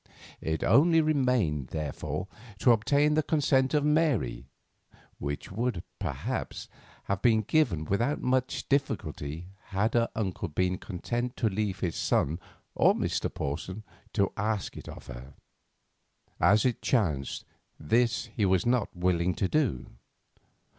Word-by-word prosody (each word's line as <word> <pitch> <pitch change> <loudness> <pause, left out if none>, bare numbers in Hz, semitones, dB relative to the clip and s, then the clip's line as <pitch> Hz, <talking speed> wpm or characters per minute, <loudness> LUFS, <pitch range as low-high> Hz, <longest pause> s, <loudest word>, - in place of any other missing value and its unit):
It 80 0 -2
only 165 +3 +5
remained, 125 - +1
therefore, 80 +5 -4 0.3
to 125 - +5
obtain 140 +7 +3
the 155 - +3
consent 140 -3 +2
of 145 -1 +2
Mary, 120 - +1 0.7
which 70 +4 -4
would 115 -3 -2 0.2
perhaps, - - -4 0.4
have 100 -1 -2
been 110 -3 +4
given 100 - +1
without 120 - 0
much 130 0 0
difficulty 85 - -2 0.2
had 100 +4 0
her 115 -1 +2
uncle 100 -5 -2
been 90 +3 0
content 120 +7 -3
to 110 - +2
leave 100 -1 -2
his 85 -3 -1
son 80 +5 +1 0.3
or - - +4
Mr. - - -1
Porson 85 +9 -4 0.3
to 100 -1 +2
ask 110 -2 -2
it - - -9
of - - -10
her. 65 +3 -10 1.0
As 105 +4 +4
it 125 -2 0
chanced, 80 - 0 0.3
this 115 +10 +1
he 110 - 0
was 95 -1 +3
not 120 -6 0
willing 90 0 +1
to 95 - 0
do. 110 - 0
105 Hz, 135 wpm, -29 LUFS, 85-125 Hz, 1.0 s, only